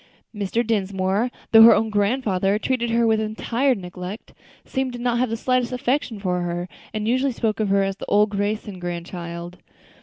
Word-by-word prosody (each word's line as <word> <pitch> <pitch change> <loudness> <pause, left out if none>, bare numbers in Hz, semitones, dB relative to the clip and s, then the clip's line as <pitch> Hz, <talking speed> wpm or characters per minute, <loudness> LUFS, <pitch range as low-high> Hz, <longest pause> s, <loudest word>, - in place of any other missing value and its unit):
Mr. 210 +3 -1
Dinsmore, 200 +1 0 0.2
though 225 - +9
her 230 - +10
own 220 0 0
grandfather, 205 -2 +1
treated 235 +1 -1
her 230 0 +2
with 220 -1 +3
entire 235 +5 0
neglect, 180 +1 -8 0.3
seemed 265 -1 -2
to - - -5
have 240 - -7 0.2
not 255 -1 +1
the 225 - -2
slightest 255 0 0
affection 250 -1 -1
for 180 -2 -1
her, 175 0 -3 0.2
and 215 0 -3
usually 260 +3 +2
spoke 225 -3 -1
of 215 -2 0
her 195 0 +3
as 195 0 -2
"old 210 0 +3
Crayson's 205 -1 -2
grandchild." 175 0 -6
215 Hz, 175 wpm, -23 LUFS, 190-235 Hz, 0.3 s, her